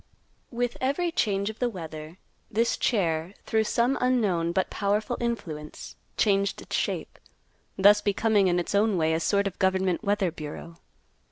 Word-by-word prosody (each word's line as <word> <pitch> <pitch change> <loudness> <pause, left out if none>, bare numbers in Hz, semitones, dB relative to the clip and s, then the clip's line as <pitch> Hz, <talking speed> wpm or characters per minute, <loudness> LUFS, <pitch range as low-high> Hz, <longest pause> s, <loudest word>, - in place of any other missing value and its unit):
With 240 0 -2
every 285 +7 0
change 200 - 0
of 220 - -18
the 245 - +1
weather, 160 -4 -8 0.3
this 230 +3 +1
chair, 175 -4 0
through 220 0 +1
some 240 +5 +1
unknown 205 -10 +1
but 185 +2 0
powerful 210 +4 0
influence, 160 -11 -5 0.2
changed 200 -2 +2
its - - -5
shape, - - -2 0.6
thus 205 +2 +6
becoming 205 -1 +2
in 175 -1 +2
its 175 - -2
own 205 -1 +3
way 160 -1 +2
a 160 - +1
sort 200 +3 +1
of 195 -2 -4
government 190 0 +1
weather 200 -3 +1
bureau. 160 +1 -8
200 Hz, 155 wpm, -27 LUFS, 175-225 Hz, 0.6 s, thus